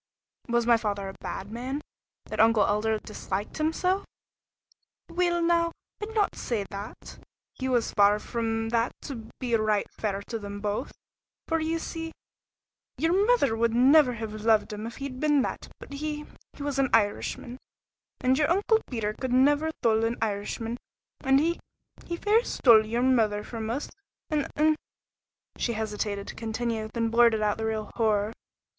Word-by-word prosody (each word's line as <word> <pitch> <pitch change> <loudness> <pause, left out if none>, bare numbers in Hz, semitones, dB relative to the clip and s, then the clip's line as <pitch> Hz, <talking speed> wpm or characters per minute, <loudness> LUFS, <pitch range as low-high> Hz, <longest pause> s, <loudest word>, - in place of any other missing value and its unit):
"Was 235 -1 +1
my 235 -1 +5
father 205 -3 -2
a 195 - -9
bad 195 +2 -5
man, 255 +5 -3 0.5
that - - -6
Uncle 225 -1 +5
'Elder' 215 +2 +1
disliked 210 +2 -5
him 310 +1 +2
so?" 370 +4 0 1.1
"Weel 345 -1 +1
now, 335 0 +3 0.3
I'd 435 +2 -5
no 420 -2 +5
say 220 -5 -2
that; 200 +1 -8 0.3
he 260 0 -3
was 245 -3 +1
far 205 0 +5
from 225 0 -2
that 230 +1 +1
to 230 -6 -7
be 245 -3 -2
right 215 -2 +2
fair 200 -2 -3
to 230 +2 -5
them 205 -1 -6
both 210 +4 -2 0.6
for 325 -1 +1
ye 320 +1 0
see 325 0 -5 0.8
ye'r 325 +2 +2
mither 415 - +3
would 230 0 +1
never 260 +2 +6
have 220 -2 -5
loved 215 0 +2
him 210 +2 -5
if 230 - -8
he'd 275 -2 -6
been 295 -2 +3
that - - -4
but - - -10
he 300 +1 -4 0.3
he 285 - -8
was 285 -1 -1
an 270 -1 +3
Irishman, 230 +3 0 0.6
and 260 +1 +3
ye'r 300 - +3
Uncle 415 +5 +3
Peter 220 -4 -2
could 255 +3 -4
never 290 +5 +4
thole 225 -1 +3
an 230 +1 0
Irishman, 225 +2 -2 0.5
and 270 0 +5
he 335 +3 +1 0.5
he 340 - -3
fair 430 +5 +3
stole 220 - +5
ye'r 235 +3 0
mither 220 -5 +3
from 225 -1 -5
us 260 +6 -2 0.4
a' 300 -2 0
an 310 +1 +4 0.4
" - - -31
she 235 - 0
hesitated 210 -2 -3
to - - -6
continue, 225 -1 -3
then 230 0 0
blurted 230 -2 +4
out 210 +1 +1
the 220 - -1
real 215 -1 -3
horror. 215 -2 +1
235 Hz, 170 wpm, -27 LUFS, 215-290 Hz, 1.1 s, never